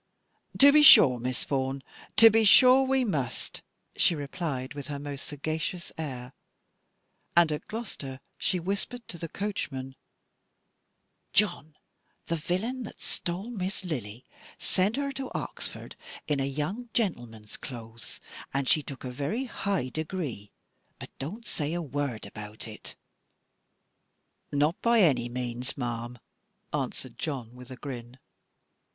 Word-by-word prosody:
"To 280 +1 +9
be 305 - +8
sure, 130 - +9
Miss 125 +1 -1
Vaughan, 135 0 -1 0.3
to 225 0 +10
be 225 +1 +4
sure 255 +5 +8
we 265 -1 +2
must," 145 - -2 0.3
she 170 - +4
replied 145 -3 -3
with 145 -2 -7
her 145 -1 -4
most 140 -1 -6
sagacious 155 +4 -3
air: 130 -5 -5 1.0
and 170 -2 +6
at 150 - -4
Gloucester 175 - -5 0.2
she 180 - 0
whispered 200 +7 -3
to 170 - -5
the 165 - -4
coachman, 135 -11 -4 1.4
"John, 175 -7 +2 0.5
the 170 - -1
villain 190 +11 -2
that 230 - -8
stole 185 +7 -3
Miss 190 -3 -3
Lily 120 - -5 0.3
sent 195 +4 +1
her 280 0 -1
to 265 -1 -5
Oxford, - - -5 0.3
in 150 -2 +1
a 135 - +1
young 155 - -3
gentleman's 120 - -2
clothes, 115 -3 -8 0.3
and 135 -1 -1
she 155 - +5
took 140 -1 -8
a 130 - -4
very 145 - -2
high 195 - -1
degree: 155 - -4 0.5
but - - -9
don't 205 - -6
say 150 -6 -2
a - - -1
word 140 -6 -3
about 105 +1 -8
it." 110 -1 -9 1.6
"Not 150 +4 +1
by 235 -1 +5
any 130 -9 +3
means, 125 +1 -3
ma'am," 120 -1 -3 0.6
answered - - -3
John, 130 -7 -3
with 125 +1 -12
a 130 - -7
grin. 125 -2 -7
150 Hz, 135 wpm, -29 LUFS, 130-195 Hz, 1.6 s, to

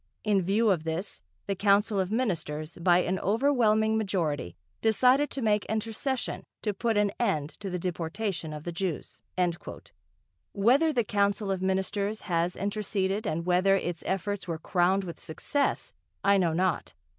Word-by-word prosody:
In 205 -3 +3
view 205 +4 +2
of 170 -5 0
this 165 +5 -3 0.2
the 200 - -1
council 200 +1 +3
of 185 -1 0
Ministers, 165 -9 -2
by 175 +1 +4
an 185 +1 -1
overwhelming 220 -2 +2
majority, 160 - -1 0.3
decided 250 +6 +4
to 270 - -3
make 210 -2 +2
intercession 225 +4 -2 0.2
to 210 - 0
put 225 +2 0
an 205 -1 +3
end 160 -10 0
to 200 -2 -5
the 180 - -2
deportation 175 0 -3
of 150 -1 -7
the 175 - -4
Jews." 170 -2 -4 1.3
Whether 255 +11 +4
the 245 -5 +1
Council 200 0 0
of 190 -1 -2
Ministers 190 +3 -1
has 175 0 0
interceded 200 0 -1
and 165 +2 -2
whether 185 +2 +4
its 175 -3 -2
efforts 195 +1 -2
were 165 -2 -2
crowned 180 +4 +1
with 170 -3 -7
success, 280 - -1 0.3
I 200 0 +5
know 170 -3 +2
not. 180 0 0
195 Hz, 155 wpm, -28 LUFS, 175-215 Hz, 1.3 s, I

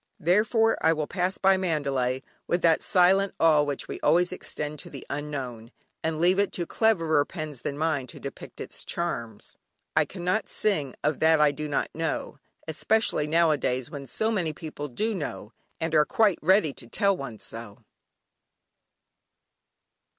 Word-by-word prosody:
Therefore 220 +6 +3
I 160 - +5
will 155 -1 -2
pass 180 +3 -1
by 195 0 +4
Mandalay 140 -7 -1 0.2
with 175 0 0
that 165 -1 +4
silent 190 +2 +3
awe 155 -2 +5
which 145 -2 -2
we - - -6
always 175 +1 +3
extend 150 -4 -5
to - - -8
the - - -9
Unknown, 135 -6 -5 0.3
and 160 -1 -1
leave 180 +3 +4
it 200 - +2
to 175 - -1
cleverer 165 -9 +2
pens 155 -4 -7
than 140 - -4
mine 155 -4 0
to - - -10
depict - - -9
its - - -7
charms. 115 -11 -4 0.4
"I - - +4
cannot 185 +3 -2
sing 150 - 0
of 150 0 0
that 160 0 +4
I 150 -1 +5
do 150 +1 -5
not 145 - -1
know," 160 -2 -3 0.3
especially 160 0 +1
nowadays 150 -6 +1
when 140 -2 -7
so 220 - -1
many 175 -8 -1
people 150 -2 -6
do 215 - -1
know, 115 - -5 0.3
and 160 0 -2
are 150 -1 +6
quite 210 -2 +2
ready 185 -3 +3
to 120 - -10
tell 200 - +2
one 135 -8 -7
so. 115 -1 -9
160 Hz, 160 wpm, -26 LUFS, 145-185 Hz, 0.4 s, are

